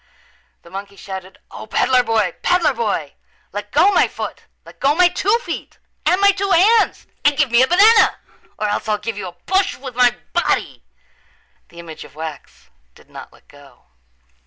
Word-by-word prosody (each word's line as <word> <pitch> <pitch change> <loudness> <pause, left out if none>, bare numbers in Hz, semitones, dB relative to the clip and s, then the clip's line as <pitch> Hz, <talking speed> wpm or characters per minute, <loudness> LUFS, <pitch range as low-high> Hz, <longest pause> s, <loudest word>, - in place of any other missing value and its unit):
The 170 - -17
monkey 200 +1 -8
shouted, 190 -1 -9
"O, - - -10
peddler 250 +3 +2
boy, 220 -7 0
peddler 350 -5 +2
boy, 205 - -3 0.4
let 205 +1 -7
go 340 - +4
my - - +3
foot. - - -7 0.2
Let - - -16
go 280 +2 +2
my 355 +1 +5
two 405 +5 +1
feet - - -7 0.3
and 365 - +3
my 400 0 +6
two 395 0 -3
hands 420 +6 +3 0.2
and 290 -1 +3
give 280 -5 +1
me 235 +1 +5
a 260 - +4
banana 430 +7 +5 0.4
or 215 - -2
else 210 +1 -3
I'll 210 - +1
give 220 +1 -5
you 195 - -5
a - - -7
push 380 - -1
with 260 -1 -9
my 245 0 +3 0.2
body." 345 - -1 0.9
The 170 - -18
image 165 -2 -10
of - - -16
wax 155 -2 -9 0.2
did - - -21
not - - -11
let - - -24
go. 145 -1 -19
245 Hz, 180 wpm, -19 LUFS, -, 0.9 s, my